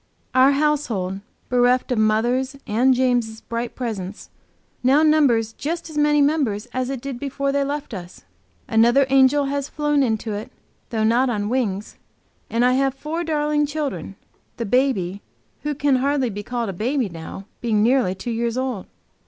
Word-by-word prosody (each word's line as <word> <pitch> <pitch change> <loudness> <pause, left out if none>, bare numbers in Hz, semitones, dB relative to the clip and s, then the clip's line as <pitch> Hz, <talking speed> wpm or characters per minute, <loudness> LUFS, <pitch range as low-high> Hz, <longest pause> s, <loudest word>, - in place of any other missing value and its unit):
Our 260 +2 +6
household, 255 -11 0 0.3
bereft 250 +1 +2
of 245 - +1
mother's 240 +5 +1
and 245 +4 +3
James' 245 -3 0
bright 235 0 -4
presence, 210 -6 -5 0.5
now 270 +5 +4
numbers 265 -8 +3
just 330 +5 -4
as - - -10
many 295 0 +4
members 275 -8 +1
as 255 0 -1
it 270 -3 -4
did 270 -2 -5
before 275 0 -2
they 280 0 +1
left 285 -2 -4
us. 180 -3 -9 0.4
Another 235 +5 +4
angel 270 +2 +4
has 280 0 -2
flown 295 -1 +1
into 220 -3 0
it, 205 +2 -6 0.4
though 220 -3 -1
not 240 +4 +3
on 205 -3 -1
wings, 215 -5 -2 0.5
and 235 +2 +2
I 250 - +4
have 270 0 +1
four 310 +5 -4
darling 300 -2 +1
children, 285 -9 -4 0.4
the 235 - -2
baby, 200 -5 +1 0.4
who 295 0 -2
can 285 -1 +2
hardly 270 -2 +1
be 205 +1 -5
called 235 0 -3
a - - -3
baby 245 +6 0
now, 170 +2 -8 0.2
being 215 -3 +2
nearly 240 -6 +2
two 235 +5 -5
years 235 +1 -1
old. 255 -6 -3
255 Hz, 165 wpm, -22 LUFS, 220-280 Hz, 0.5 s, Our